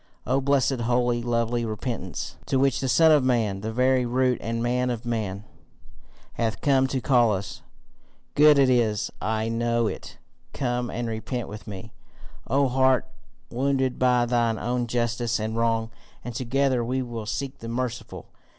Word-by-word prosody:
O 135 Hz, +2 st, +1 dB
blessed, 135 Hz, -1 st, +2 dB
holy, 120 Hz, 0 st, +1 dB
lovely 120 Hz, 0 st, 0 dB
repentance 110 Hz, -4 st, -4 dB
to 135 Hz, -, +1 dB
which 135 Hz, 0 st, +2 dB
the 130 Hz, -, -2 dB
Son 160 Hz, +4 st, +5 dB
of 150 Hz, -3 st, +5 dB
Man, 110 Hz, -6 st, +1 dB
the 110 Hz, +2 st, -3 dB
very 130 Hz, +2 st, +2 dB
root 125 Hz, 0 st, +1 dB
and 115 Hz, 0 st, -2 dB
man 125 Hz, +1 st, 0 dB
of 120 Hz, -1 st, -4 dB
men, 105 Hz, -4 st, -3 dB, 0.9 s
hath 115 Hz, -1 st, -2 dB
come 135 Hz, -2 st, +3 dB
to 130 Hz, 0 st, -2 dB
call 120 Hz, -3 st, +3 dB
us! 95 Hz, +1 st, -6 dB, 0.7 s
Good 150 Hz, 0 st, +6 dB
it 135 Hz, -1 st, +5 dB
is, 115 Hz, -5 st, +1 dB
and 105 Hz, -, -2 dB
I 110 Hz, 0 st, 0 dB
know 115 Hz, 0 st, 0 dB
it. -, -, -5 dB, 0.4 s
Come 120 Hz, -2 st, -2 dB
and 120 Hz, 0 st, -3 dB
repent 115 Hz, +2 st, -4 dB
with 105 Hz, +2 st, -9 dB
me, 105 Hz, +2 st, -8 dB, 0.5 s
O 140 Hz, 0 st, +2 dB
heart 130 Hz, 0 st, +3 dB, 0.5 s
wounded 130 Hz, +1 st, 0 dB
by 125 Hz, -1 st, +3 dB
thine 120 Hz, -2 st, +1 dB
own 125 Hz, +2 st, -1 dB
injustice 120 Hz, 0 st, -1 dB
and 110 Hz, +1 st, -3 dB
wrong, 115 Hz, -1 st, 0 dB, 0.3 s
and 120 Hz, -, -5 dB
together 130 Hz, +1 st, 0 dB
we 130 Hz, +2 st, -1 dB
will 115 Hz, -3 st, -6 dB
seek 135 Hz, +4 st, -4 dB
the 115 Hz, -, -7 dB
merciful. 120 Hz, 0 st, -4 dB
120 Hz, 165 wpm, -25 LUFS, 115-130 Hz, 0.9 s, Good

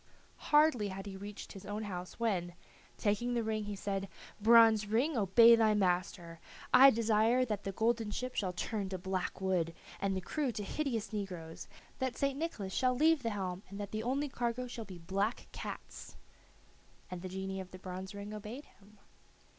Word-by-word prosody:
Hardly 295 Hz, -8 st, +5 dB
had 195 Hz, 0 st, -6 dB
he 200 Hz, -1 st, -7 dB
reached 200 Hz, +1 st, -8 dB
his 195 Hz, -, -10 dB
own 205 Hz, +2 st, -4 dB
house 180 Hz, -2 st, -6 dB
when, 180 Hz, -7 st, -1 dB, 0.4 s
taking 230 Hz, +4 st, 0 dB
the 235 Hz, -, +1 dB
ring, 215 Hz, -1 st, -2 dB
he 205 Hz, 0 st, -4 dB
said, 195 Hz, 0 st, -3 dB, 0.3 s
"Bronze 225 Hz, -1 st, +6 dB
ring, 250 Hz, +9 st, +1 dB
obey 230 Hz, +2 st, +7 dB
thy 220 Hz, -2 st, +3 dB
master. 180 Hz, -3 st, -1 dB, 0.3 s
I 270 Hz, +1 st, +10 dB
desire 230 Hz, +1 st, +3 dB
that 210 Hz, -3 st, -3 dB
the 195 Hz, -, -1 dB
golden 225 Hz, +1 st, 0 dB
ship 250 Hz, +4 st, -4 dB
shall 190 Hz, -3 st, -1 dB
turn 200 Hz, +2 st, -3 dB
to 190 Hz, -, -3 dB
black 185 Hz, 0 st, -3 dB
wood, 180 Hz, -3 st, 0 dB, 0.2 s
and 195 Hz, -1 st, 0 dB
the -, -, +1 dB
crew 280 Hz, -, -1 dB
to 210 Hz, -, -4 dB
hideous 235 Hz, -2 st, -2 dB
negroes; 180 Hz, -6 st, -5 dB, 0.3 s
that 260 Hz, -1 st, -2 dB
St. 275 Hz, 0 st, 0 dB
Nicholas 215 Hz, -, -3 dB
shall 255 Hz, -1 st, +2 dB
leave 315 Hz, +2 st, +4 dB
the 230 Hz, -, -1 dB
helm 190 Hz, -3 st, -3 dB
and 200 Hz, +1 st, -8 dB
that 205 Hz, -1 st, -5 dB
the 215 Hz, -, -2 dB
only 270 Hz, +5 st, 0 dB
cargo 245 Hz, -2 st, -2 dB
shall 235 Hz, -2 st, -7 dB
be 190 Hz, -3 st, -9 dB
black 195 Hz, +7 st, -2 dB
cats." -, -, -8 dB, 1.0 s
And 180 Hz, -1 st, -5 dB
the 185 Hz, -, -6 dB
genii 190 Hz, +1 st, -4 dB
of 185 Hz, -1 st, -7 dB
the 185 Hz, -, -10 dB
bronze 185 Hz, +1 st, -7 dB
ring 200 Hz, +1 st, -7 dB
obeyed 215 Hz, +7 st, -7 dB
him. 210 Hz, +1 st, -22 dB
210 Hz, 185 wpm, -33 LUFS, 190-235 Hz, 1.0 s, I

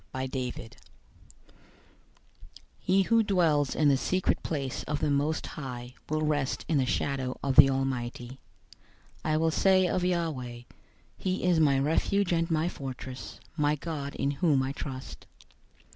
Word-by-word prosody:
091:001 130 Hz, -3 st, -4 dB, 2.1 s
He 190 Hz, +2 st, +3 dB
who 230 Hz, +5 st, +4 dB
dwells 165 Hz, -9 st, +2 dB
in 150 Hz, -, +3 dB
the 140 Hz, -, +5 dB
secret 185 Hz, +7 st, 0 dB
place 140 Hz, -5 st, -3 dB
of 150 Hz, 0 st, -2 dB
the 150 Hz, -1 st, 0 dB
Most 145 Hz, +3 st, 0 dB
High 125 Hz, -3 st, -7 dB, 0.2 s
will 155 Hz, 0 st, 0 dB
rest 145 Hz, -3 st, -1 dB
in 155 Hz, -4 st, +2 dB
the 130 Hz, -, +1 dB
shadow 130 Hz, -1 st, -1 dB
of 135 Hz, -1 st, 0 dB
the 135 Hz, -, +9 dB
Almighty. 130 Hz, -1 st, -3 dB, 0.8 s
091:002 -, -, -20 dB
I 155 Hz, 0 st, +2 dB
will 160 Hz, +1 st, +2 dB
say 190 Hz, +2 st, +4 dB
of 180 Hz, +1 st, 0 dB
Yahweh, 155 Hz, -10 st, -2 dB, 0.6 s
"He 185 Hz, 0 st, -2 dB
is 180 Hz, -2 st, +3 dB
my 140 Hz, -3 st, +4 dB
refuge 170 Hz, +7 st, +1 dB
and 165 Hz, 0 st, +1 dB
my 160 Hz, 0 st, +1 dB
fortress; 130 Hz, -4 st, -7 dB, 0.2 s
my 150 Hz, -1 st, +2 dB
God, 145 Hz, -2 st, -5 dB
in 140 Hz, +1 st, 0 dB
whom 145 Hz, -2 st, +2 dB
I 135 Hz, -, -2 dB
trust." 135 Hz, -2 st, -7 dB
145 Hz, 145 wpm, -29 LUFS, 135-165 Hz, 2.1 s, the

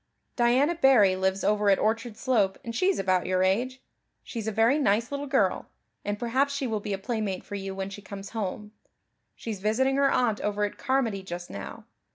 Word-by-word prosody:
"Diana 255 Hz, +6 st, +3 dB
Barry 260 Hz, -, +5 dB
lives 190 Hz, +1 st, 0 dB
over 210 Hz, 0 st, +2 dB
at 195 Hz, -, +5 dB
Orchard 225 Hz, +1 st, -1 dB
Slope 225 Hz, -6 st, +1 dB
and 230 Hz, -1 st, -5 dB
she's 370 Hz, +7 st, +2 dB
about 185 Hz, -1 st, +1 dB
your 185 Hz, 0 st, +2 dB
age. 245 Hz, +8 st, 0 dB, 0.4 s
She's 225 Hz, -3 st, -6 dB
a -, -, 0 dB
very 230 Hz, +7 st, +3 dB
nice 230 Hz, -1 st, +1 dB
little 285 Hz, 0 st, -3 dB
girl, 235 Hz, -9 st, +1 dB, 0.4 s
and 205 Hz, 0 st, -2 dB
perhaps 260 Hz, +5 st, 0 dB
she 280 Hz, -1 st, -2 dB
will 220 Hz, -3 st, -1 dB
be 205 Hz, 0 st, -4 dB
a -, -, -1 dB
playmate 205 Hz, -3 st, -3 dB
for -, -, -11 dB
you 195 Hz, -1 st, -4 dB
when 195 Hz, 0 st, -4 dB
she 205 Hz, -, -8 dB
comes 200 Hz, 0 st, -8 dB
home. 210 Hz, -1 st, -4 dB, 0.6 s
She's 220 Hz, -4 st, -6 dB
visiting 260 Hz, +7 st, +1 dB
her 280 Hz, 0 st, +4 dB
aunt 225 Hz, -4 st, +1 dB
over 210 Hz, 0 st, -1 dB
at 205 Hz, -, -3 dB
Carmody 250 Hz, -7 st, 0 dB
just 175 Hz, -1 st, -7 dB
now. 100 Hz, -, -8 dB
215 Hz, 200 wpm, -27 LUFS, 195-255 Hz, 0.6 s, Barry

